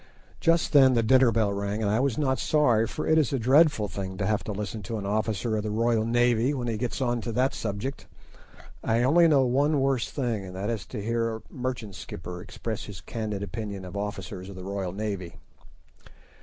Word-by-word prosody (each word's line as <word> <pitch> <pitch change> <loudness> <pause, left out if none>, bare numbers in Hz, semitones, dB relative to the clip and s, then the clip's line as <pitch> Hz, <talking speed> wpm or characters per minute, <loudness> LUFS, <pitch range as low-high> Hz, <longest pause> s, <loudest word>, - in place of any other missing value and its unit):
Just 165 -1 +2
then 135 -3 +7
the 115 - +3
dinner 130 +1 +5
bell 110 -3 +1
rang, 100 +2 -2
and 100 - +1
I 110 - +2
was 130 -3 +1
not 130 -3 +1
sorry, 120 -8 +3
for - - -4
it 160 0 +4
is 150 - +1
a 135 - +1
dreadful 130 -1 +4
thing 95 -1 -5
to 95 - -1
have 105 +1 0
to - - -3
listen 105 +1 -4
to 110 +4 -4
an 100 - -5
officer 110 +2 -1
of 105 - 0
the 105 - -3
Royal 115 +1 +1
Navy 120 +3 +2
when 125 -3 -3
he 115 - -1
gets 120 +4 -3
on 120 -2 0
to 115 - -4
that 130 +3 +2
subject. 110 +6 -4 0.8
I 115 +1 +2
only 165 +6 +5
know 140 -4 +4
one 140 +4 +2
worse 135 -3 +1
thing, 120 -7 -2
and 90 -1 -9
that 100 +4 -2
is 110 -4 -4
to 105 -5 -6
hear 115 0 0
a 110 - -9
merchant 125 -5 -4
skipper 90 0 -7
express - - -5
his - - -8
candid 105 -3 -4
opinion 100 -1 -5
of 90 - -9
officers 95 -2 -5
of 100 - -9
the 90 - -8
Royal 95 -1 -3
Navy. 100 -3 -4
115 Hz, 215 wpm, -27 LUFS, 100-130 Hz, 0.8 s, then